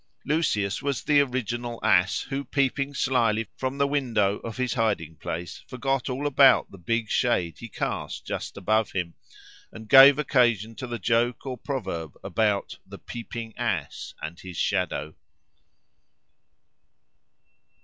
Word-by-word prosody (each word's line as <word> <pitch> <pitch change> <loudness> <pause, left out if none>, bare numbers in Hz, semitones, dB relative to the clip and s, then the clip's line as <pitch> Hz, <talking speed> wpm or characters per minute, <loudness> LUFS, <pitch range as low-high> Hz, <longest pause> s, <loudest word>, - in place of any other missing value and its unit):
Lucius 105 -11 0
was 140 -3 -2
the 145 -1 +4
original 120 -3 -3
ass, 95 +3 +3
who 135 +1 -2
peeping 140 +1 0
slily 115 -5 +1
from 130 +1 -3
the 140 - +3
window 115 -8 +1
of 115 +1 -7
his 130 -1 0
hiding 105 - -1
place 85 +3 -6
forgot 135 0 -2
all 130 +3 -3
about 140 -2 +5
the 95 - -12
big 115 +6 -1
shade 90 -8 0
he 115 - -8
cast - - -4
just - - -5
above 110 +2 +1
him, 90 -3 -2 0.6
and 110 0 -11
gave 135 +3 +9
occasion 120 -7 +2
to 130 +3 -7
the 120 0 -4
joke 115 +2 0
or 130 -1 -3
proverb 95 - -5
about 105 -3 0
"the - - -11
peeping 115 -1 -7
ass - - -3
and 85 +3 -6
his 90 -3 -9
shadow." 75 +1 -1
115 Hz, 140 wpm, -26 LUFS, 100-135 Hz, 0.6 s, gave